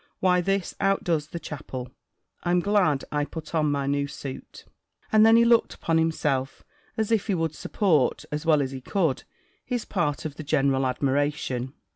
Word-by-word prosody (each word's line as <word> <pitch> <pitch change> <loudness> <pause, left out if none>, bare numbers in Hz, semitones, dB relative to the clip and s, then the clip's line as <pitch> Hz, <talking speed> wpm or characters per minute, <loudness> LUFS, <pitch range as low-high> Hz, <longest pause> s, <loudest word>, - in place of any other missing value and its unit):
Why 180 -1 +3
this 195 0 -1
outdoes 175 -6 +1
the 170 - -6
chapel! 130 -5 -7 0.5
I'm 175 0 +2
glad 180 -7 +2
I 150 0 0
put 160 +2 -8
on 155 -2 +2
my 140 -1 0
new 140 0 0
suit!" 135 -1 -9 0.5
And 215 0 +6
then 225 +1 +7
he 235 0 +6
looked 235 -1 +3
upon 165 -1 +1
himself, 140 -5 -1 0.3
as 220 0 -1
if 220 -2 +1
he 200 - +1
would 165 -2 -1
support, 155 - +1
as 150 +1 -3
well 155 -3 +3
as 135 - -4
he 135 -1 -7
could, 165 -2 -1 0.4
his 245 -3 -3
part 160 -6 -1
of 145 -2 -5
the - - -6
general 135 -3 +2
admiration. 135 -1 -1
155 Hz, 175 wpm, -26 LUFS, 140-185 Hz, 0.5 s, then